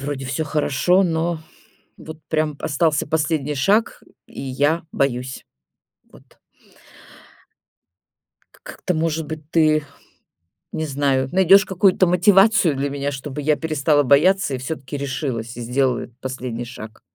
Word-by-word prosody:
Вроде 140 -1 -4
всё 135 +4 -2
хорошо, 155 +5 +2
но 165 -1 -1 0.6
вот 160 0 -10
прям 155 -2 -1
п - - -10
остался 150 0 +1
последний 155 -2 -1
шаг, 200 +11 +1 0.2
и - - -10
я 145 +5 0
боюсь. 130 -1 -2 0.7
Вот. - - -20 2.2
К - - -24
как-то, 180 - -4
может 160 -1 -1
быть, 155 -1 -8
ты, 155 -2 +3 0.9
не 160 - -3
знаю, 135 -2 0
найдешь 190 +2 +5
какую-то 190 0 +3
мотивацию 190 -1 +4
для 140 +1 -2
меня, 140 0 -3
чтобы 140 +1 -6
я 150 +1 +2
перестала 150 -2 +1
бояться 150 +5 +3
и - - -1
всё-таки 140 +1 -6
решилась 130 -4 -4
и - - -6
сделала 125 +1 0
этот 120 - -15
последний 125 -2 -5
шаг. 110 -3 -10
150 Hz, 135 wpm, -21 LUFS, 135-165 Hz, 2.2 s, найдешь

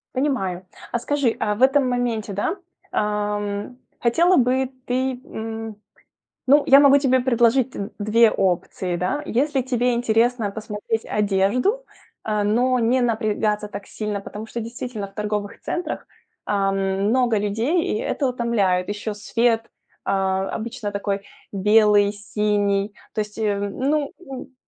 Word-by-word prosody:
Понимаю, 195 -10 -1 0.3
а 240 - 0
скажи, 280 -2 0
а 210 -1 0
в 235 - -8
этом 270 0 +4
моменте, 235 -4 -1
да, 205 - -1 0.4
ам, 210 +2 -2 0.2
хотела 340 +10 +3
бы 255 +1 +2 0.2
ты, 255 0 -1
м 225 -1 -6 0.7
ну, 285 +2 +6
я 275 - +8
могу 280 0 +7
тебе 260 -2 +3
предложить 245 0 +3
д 200 -4 -5
две 215 +2 +4
опции, 180 -1 -1
да. 185 - -1
Если 270 +2 0
тебе 245 -1 +1
интересно 235 -1 +1
посмотреть 215 +1 -4
одежду, 210 - +1 0.4
э, 210 -1 0
но 245 +5 +2
не 245 +3 +2
напрягаться 215 -2 0
так 200 0 -8
сильно, 210 -2 -4
потому 210 +2 -8
что 235 +1 -5
действительно 230 -2 -5
в 195 - -22
торговых 210 -1 -3
центрах, 345 -2 -4 0.4
ам, 195 -1 +1 0.3
много 240 -2 +2
людей 225 - 0
и - - -1
это 280 - -1
утомляет. 210 -7 +1
Еще 205 +1 -4
свет, 230 +2 0 0.3
а, 190 0 0
обычно 225 -1 -4
такой 200 0 -2 0.3
белый, 210 0 +4
синий. 205 -1 0 0.2
То 215 - 0
есть, 210 +1 -11
э, 210 -2 0
ну, 275 +9 -1
н 265 -5 -9
225 Hz, 140 wpm, -22 LUFS, 205-250 Hz, 0.7 s, я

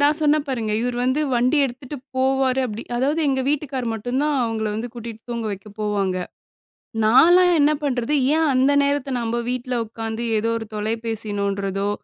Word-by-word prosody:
நான் 290 +2 +3
சொன்னேன் 300 -1 +2
பாருங்க. 225 -5 -2
இவர் 245 0 -2
வந்து 260 +4 +1
வண்டி 250 +5 +3
எடுத்துட்டு 265 +3 -6 0.2
போவாரு 265 0 +2
அப்டி 220 0 -6
அதாவது 290 +6 +1
எங்க 265 -1 +1
வீட்டுக்கார் 275 -4 -2
மட்டும் 245 +5 -2
தான் 300 0 +1
அவங்கள 225 -1 -1
வந்து 230 +3 -3
கூட்டிட்டு 230 -2 -8
தூங்க 230 -2 -3
வைக்க 195 +2 -9
போவாங்க. 200 -3 0 0.9
நான்லாம் 350 +10 +6
என்ன 295 +1 +5
பண்றது? 260 0 -1 0.2
ஏன் 320 -1 +2
அந்த 260 +2 +3
நேரத்துல 280 -2 0
நம்ம 230 +1 -2
வீட்ல 250 0 -3
உட்காந்து 225 +1 -5
ஏதோ 225 +2 0
ஒரு 225 - -6
தொலைபேசி 220 0 -3
நோண்றதோ, 200 0 -1
245 Hz, 165 wpm, -22 LUFS, 220-280 Hz, 0.9 s, நான்லாம்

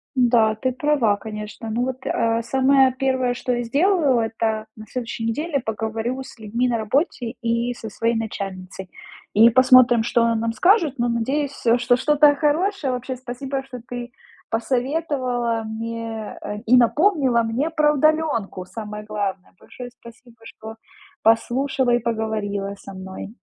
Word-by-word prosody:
Да, 235 -4 +3
ты 255 +4 -2
права, 255 -6 +1
конечно. 210 +1 -7
Ну 235 +3 0
вот, 260 0 -5
э, 230 0 0
самое 265 +2 +3
первое, 260 -2 +1
что 250 +1 -2
я 240 0 -1
сделаю- 290 - +2
это 225 -1 -2
на 215 0 -11
следующей 235 0 -5
неделе 285 +5 -1
поговорю 225 +3 -3
с 260 - -13
людьми 230 +3 -1
на 240 - +1
работе 240 - -1
и 235 0 0
со 225 - -8
своей 230 +3 -1
начальницей, 190 -4 -5 0.4
и 225 +3 +7
посмотрим, 255 -1 +6
что 235 +1 +1
она 230 0 +2
нам 225 0 -1
скажет, 335 - +3
но 240 0 +1
надеюсь, 270 +5 -1 0.2
что 245 0 +3
что-то 295 +2 +4
хорошее. 310 0 0
Вообще, 255 +1 -4
спасибо, 260 +2 -5
что 250 -2 -9
ты 245 0 -6 0.4
посоветовала 250 -1 -1
мне, 225 0 -5
э, 210 - -5
и 250 +3 +6
напомнила 265 - +3
мне 235 +8 -1
про 305 -2 +2
удалёнку 295 -11 0
самое 210 +1 -7
главное. 205 -3 -4
Большое 250 -1 -10
спасибо, 235 0 -16
что 220 0 -10 0.5
послушала 255 +3 +2
и - - +4
поговорила 215 -3 -2
со 195 - -11
мной. 190 +3 -8
240 Hz, 150 wpm, -22 LUFS, 220-265 Hz, 0.5 s, и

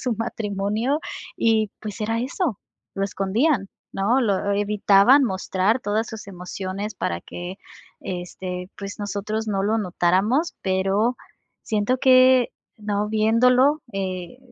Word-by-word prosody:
su 250 - -1
matrimonio 220 +4 -1 0.4
y, 220 -2 +2
pues, 215 0 -7
era 225 +2 0
eso, 260 - -2 0.4
lo 195 0 -1
escondían, 200 - 0 0.2
¿no? 225 +7 +2
Lo 200 -3 +1
evitaban 205 +5 +4
mostrar 190 +3 0
todas 215 +2 -1
sus 220 -2 -8
emociones 190 +3 -5
para 85 - -2
que, 175 - -7 0.4
este, 180 0 -6
pues, 200 +1 -7
nosotros 205 +2 -3
no 195 -2 0
lo 220 +2 +1
notáramos, 195 - +1
pero 195 +5 +1 0.5
siento 220 +4 0
que 255 -1 +5 0.3
no 210 0 -1
viéndolo, 250 +7 +3
eh, 185 +3 -4
210 Hz, 120 wpm, -23 LUFS, 195-230 Hz, 0.5 s, que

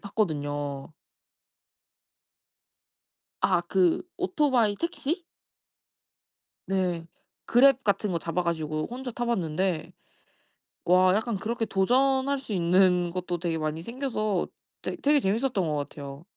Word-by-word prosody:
탔거든요. 145 -8 -2 2.5
아 180 -3 +3
그 180 -1 +2
오토바이 285 - +2
택시? 335 0 -2 1.4
네. 180 -3 -1 0.4
그랩 265 +1 +5
같은 205 0 +1
거 170 - 0
잡아 170 +2 -2
가지고 155 -2 -2
혼자 250 0 -5
타 240 - -3
봤는데 180 -5 -1 0.9
와 185 +1 +5
약간 220 -1 -1
그렇게 225 +3 -2
도전할 265 +7 +2
수 235 -6 -6
있는 180 0 +3
것도 180 -1 -3
되게 165 -2 -1
많이 155 +1 -3
생겨서 215 -4 -2 0.3
되 - - -4
되게 295 -2 +3
재미있었던 215 - 0
것 150 - -1
같아요. 140 0 -6
190 Hz, 225 characters per minute, -27 LUFS, 170-245 Hz, 2.5 s, 그랩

